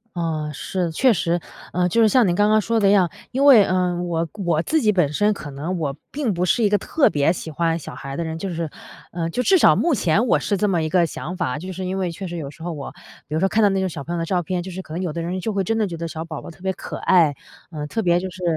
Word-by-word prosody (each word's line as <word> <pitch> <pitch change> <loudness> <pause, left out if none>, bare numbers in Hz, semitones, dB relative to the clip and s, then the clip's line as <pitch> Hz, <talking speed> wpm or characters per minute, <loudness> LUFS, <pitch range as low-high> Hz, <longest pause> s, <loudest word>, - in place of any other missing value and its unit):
啊， 155 -3 -2
是， 175 +4 -3
确 250 +9 +4
实。 175 -2 0 0.3
呃， 180 0 +1
就 205 +6 +2
是 220 - +5
像 250 -3 +4
您 175 - +1
刚 205 +2 +3
刚 215 0 +5
说 230 +2 0
的 200 - +4
一 - - +5
样， 185 -4 +4 0.2
因 270 +3 +1
为， 250 -8 +9
呃， 180 -1 +1
我 170 -1 -1
我 175 -6 0
自 315 - +1
己 215 - +3
本 175 -8 +2
身 210 +6 +2
可 150 -7 -8
能 155 +7 -4
我 140 -4 -2 0.2
并 275 -7 -1
不 175 0 -1
是 185 +6 +2
一 - - +5
个 205 0 +3
特 285 - +2
别 145 +2 +2
喜 170 -2 -5
欢 165 +2 0
小 - - -9
孩 135 0 -7
的 170 - -1
人 160 0 -4
就 195 +3 -4
是， 165 -2 -3 0.4
呃， 165 -1 -2
就 245 - -1
至 380 +9 +4
少 - - +6
目 335 -4 +2
前 205 +4 +2
我 - - +4
是 200 - -1
这 210 - +1
么 175 -5 +1
一 155 - -1
个 175 +1 +3
想 165 +2 -6
法。 165 -7 -1
就 185 +4 -6
是 185 +1 -5
因 185 +1 -2
为 185 -2 -1
确 190 +3 -6
实 175 - -6
有 145 -4 -5
时 160 - -17
候 170 +1 -4
我 145 -3 -7 0.4
比 150 - -7
如 - - +1
说 190 - +3
看 215 +3 +2
到 205 - +6
那 195 0 0
种 190 - 0
小 155 -5 -6
朋 170 - -5
友 175 - -1
的 165 - -1
照 180 +1 0
片， 180 +2 -2
就 185 - -7
是 185 +1 -6
可 155 - -11
能 175 - -3
有 175 -5 -3
的 170 - -3
人 175 +3 -3
就 215 +4 -3
会 195 -1 0
真 225 +4 -1
的 215 - +1
觉 175 - -5
得 165 0 -4
小 160 +1 -5
宝 160 -3 -7
宝 - - -9
特 - - -19
别 190 0 -1
可 - - -7
爱， 170 -6 +4 0.4
呃， 150 -2 -5
特 225 +9 -2
别 175 -3 +3
就 185 +1 -4
是， 180 +1 -10
180 Hz, 335 characters per minute, -22 LUFS, 165-200 Hz, 0.4 s, 为